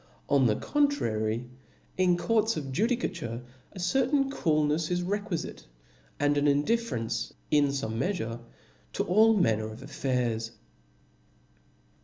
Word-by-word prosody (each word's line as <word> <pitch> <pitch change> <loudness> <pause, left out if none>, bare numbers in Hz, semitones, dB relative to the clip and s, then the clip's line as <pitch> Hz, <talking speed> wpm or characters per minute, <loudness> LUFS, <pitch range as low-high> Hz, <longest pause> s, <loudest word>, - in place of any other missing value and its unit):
On 135 -3 +4
the 105 - +2
contrary, 115 - 0 0.5
in 180 -1 +3
courts 220 +3 +1
of 140 -3 -4
ju 200 - +2
dicature 125 - -3 0.3
a 190 - -9
certain 270 +8 +2
coolnefs 155 - +1
is 180 0 0
requifite, 200 -2 -3 0.5
and 145 0 +2
an 145 - +2
indif 225 +12 +2
ferencet 115 0 -3 0.2
in 145 -1 +5
fome 125 -5 -2
meafure, 120 - -2 0.5
to - - 0
all 220 +4 +5
manner 110 - +1
of 110 +3 -10
affiiirs. 125 -5 -2
150 Hz, 125 wpm, -28 LUFS, -, 0.5 s, in